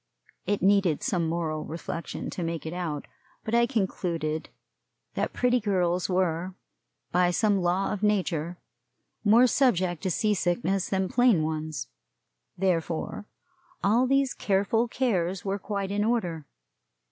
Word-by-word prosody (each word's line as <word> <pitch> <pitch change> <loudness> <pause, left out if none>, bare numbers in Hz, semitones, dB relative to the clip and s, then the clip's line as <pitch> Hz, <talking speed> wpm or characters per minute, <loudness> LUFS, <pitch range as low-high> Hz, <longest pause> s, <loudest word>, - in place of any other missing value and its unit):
It 205 -3 0
needed 195 -5 +3
some 170 -3 0
moral 160 -2 -2
reflection 165 +1 -5
to - - -5
make 165 -2 -3
it 160 - -4
out; 170 -5 -3 0.4
but 220 - -4
I 235 0 +4
concluded 170 - -2 0.6
that - - -1
pretty 250 0 +2
girls 180 -4 0
were, 180 0 0 0.6
by 180 0 +3
some 200 +2 +2
law 180 +3 +1
of 205 - -4
nature, 180 -5 0 0.7
more 225 +4 +6
subject 190 - +2
to 190 - -1
sea 210 +5 +1
sickness 180 0 0
than 190 -1 0
plain 235 -7 +4
ones; 155 - -3 0.7
therefore, 175 +1 -1 0.6
all 230 +6 +3
these 275 0 +2
careful 205 +4 +1
cares 195 -8 -1
were 195 +1 -1
quite 200 -1 -3
in 205 +1 +1
order. 180 -10 -1
185 Hz, 135 wpm, -27 LUFS, 170-210 Hz, 0.7 s, more